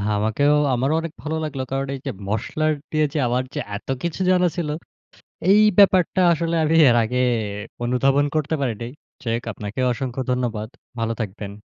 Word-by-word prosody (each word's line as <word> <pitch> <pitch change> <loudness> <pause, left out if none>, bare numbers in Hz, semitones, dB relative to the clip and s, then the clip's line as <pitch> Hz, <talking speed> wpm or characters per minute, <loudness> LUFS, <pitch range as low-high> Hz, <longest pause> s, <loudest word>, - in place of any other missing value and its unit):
আমাকেও। 110 +8 +2 0.2
আমারও 130 +5 +1
অনেক 165 -1 -6
ভালো 155 +1 -2
লাগলো। 140 -4 -3
কারণ 135 0 -1
এইযে 135 - -5 0.2
মসলার 155 +9 0 0.2
দিয়ে 155 -1 +2
যে - - -2
আমার 125 +2 0
যে, - - -3 0.2
এত - - -16 0.2
কিছু 170 +2 -3
জানা 180 -1 +4
ছিলো। 155 -4 -2 0.8
এই 210 +2 +6 0.2
ব্যাপারটা 190 -2 +5
আসলে 165 +1 -1
আমি 155 +1 +2
এর 120 - +4
আগে 125 +3 -2 0.2
এ - - -1 0.4
অনুধাবন 135 +3 +2
করতে 155 +1 0
পারিনি। 115 -3 -2 0.4
চেক 115 0 -1
আপনাকেও 110 +5 -3
অসংখ্য 130 +1 -4
ধন্যবাদ। 115 -4 -2 0.3
ভালো 115 0 0
থাকবেন। 100 -1 -5
135 Hz, 165 wpm, -22 LUFS, 115-155 Hz, 0.8 s, এই